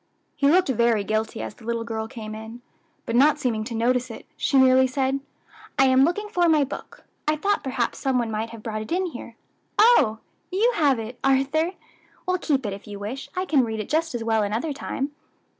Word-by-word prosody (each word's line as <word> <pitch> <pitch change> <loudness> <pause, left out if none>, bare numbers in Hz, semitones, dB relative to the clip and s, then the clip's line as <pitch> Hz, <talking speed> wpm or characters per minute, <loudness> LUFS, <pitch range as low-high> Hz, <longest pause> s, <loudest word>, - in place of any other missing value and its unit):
He 280 -2 +2
looked 365 +3 +4
very 235 -4 +2
guilty 220 +2 -2
as - - -6
the 230 - -18
little 230 0 -2
girl 220 -1 -4
came 220 -3 -8
in, 220 +2 -9 0.4
but 230 - -2
not 290 +4 +5
seeming 240 -7 -1
to 230 0 -5
notice 250 +2 +1
it, 225 - -9
she 275 - +1
merely 260 0 +6
said, 265 +1 0 0.6
"I 270 - +6
am 260 0 +5
looking 415 +6 -1
for 355 -5 +2
my 305 -2 +4
book. 275 - -8 0.2
I 305 - +3
thought 400 +7 0
perhaps 255 -3 -2
some 265 -2 +1
one 235 -2 -1
might 220 +1 -2
have 230 -2 -11
brought 215 -1 -3
it 215 - -8
in 370 +2 +1
here. 350 - -8 0.4
Oh! 425 - +5 0.3
you 435 +7 +3
have 285 -5 +3
it, 225 +2 -7
Arthur! 275 +6 +2 0.5
well, 365 0 0
keep 275 -7 0
it, 205 - -2
if 200 +2 -10
you 205 -1 -7
wish; 225 +8 -6
I 370 +1 -1
can 295 -7 +3
read 220 -2 -3
it 215 - -5
just 320 -2 0
as 235 - -3
well 225 -1 +2
another 225 +9 -1
time." 275 +1 -4
255 Hz, 215 wpm, -24 LUFS, 225-300 Hz, 0.6 s, merely